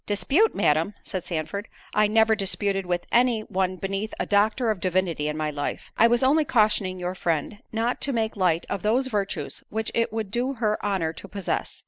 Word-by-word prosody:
"Dispute, 270 - +2
Madam!" 160 +7 +2
said 185 -2 -5
Sandford, 185 +5 -3 0.3
"I 210 0 +4
never 220 +1 +4
disputed 195 -1 -1
with 175 -1 -1
any 240 -2 +3
one 190 -3 -1
beneath 195 +3 -3
a - - 0
doctor 215 +3 +2
of 210 - -3
divinity 175 -4 0
in 150 0 -2
my 155 -1 -1
life. 145 -1 -4
I 230 - +6
was 240 +2 +2
only 295 +4 +4
cautioning 210 -7 +1
your 180 0 -2
friend 175 +3 -2
not 230 +2 -1
to 280 - +3
make 225 -3 -1
light 180 -4 +1
of 200 - -3
those 235 +5 +2
virtues 205 -6 -3
which 220 +1 -3
it 230 0 +1
would 220 -3 -3
do 250 +4 0
her 215 -4 -1
honour 190 -6 0
to 200 - -10
possess. 195 -2 -3
205 Hz, 195 wpm, -25 LUFS, 185-225 Hz, 0.3 s, I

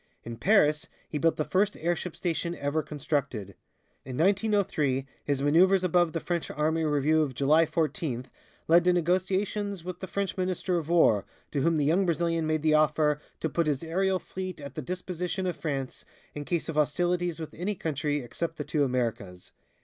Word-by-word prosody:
In 115 0 -7
Paris 155 - +3 0.2
he 150 - -3
built 165 +2 +2
the 155 - 0
first 200 +2 +1
airship 175 +1 -2
station 170 0 -2
ever 145 +1 -1
constructed. 140 -9 -3 0.5
In 130 -1 -6
1903, 185 -8 +1 0.2
his 140 -1 0
maneuvers 185 +6 +4
above 175 -2 +3
the 165 - -1
French 170 0 -3
army 160 +2 0
review 150 +1 +2
of 140 -5 -2
July 155 +5 +4
fourteenth 155 -5 -2 0.4
led 170 +2 +6
to 180 - +5
negotiations 185 +2 0
with 180 0 -6
the 190 - -6
French 200 +1 -2
Minister 185 -1 0
of 160 -1 -7
War, 160 - +4 0.3
to 140 - 0
whom 165 +3 +2
the 145 - +1
young 180 +6 +2
Brazilian 165 -1 0
made 155 -1 0
the 155 -1 +3
offer 150 -1 +3 0.2
"to - - +1
put 165 +1 0
his 145 0 0
aerial 190 +3 +1
fleet 185 -1 -6
at 140 -1 -8
the 155 - -4
disposition 180 +3 -4
of 180 - -1
France 135 -5 -4 0.3
in 145 0 -6
case 170 0 -1
of 165 - -3
hostilities 175 +3 +1
with 160 - -7
any 195 +5 -3
country 150 -3 -2
except 165 +7 -4
the 150 - -3
two 150 0 0
Americas." 115 -8 -2
160 Hz, 180 wpm, -28 LUFS, 145-180 Hz, 0.5 s, led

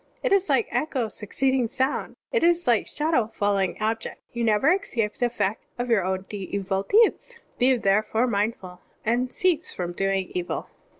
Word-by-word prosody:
It - - +2
is 395 0 +2
like 445 - +3
echo 260 -7 -1
succeeding 260 +4 0
sound, 260 +4 -2 0.2
it 475 - +1
is 345 0 +3
like 235 -3 +2
shadow 300 -7 +1
following 200 -4 0
object; 225 +1 -2
you 235 -1 -2
never 230 +9 +4
escape 230 - -1
the 245 - 0
effect 220 -3 -2 0.2
of 245 0 -3
yoiir 220 -5 +3
own 190 +1 -2
evil 195 -1 -2
deeds. 455 - +2 0.2
Be 255 +1 +4
therefore 215 +3 +2
mindful, 200 -5 -2 0.3
and 245 +3 +1
cease 360 0 0
from 175 -1 -3
doing 195 0 -1
evil.'" 180 -1 -4
230 Hz, 165 wpm, -25 LUFS, 200-270 Hz, 0.3 s, never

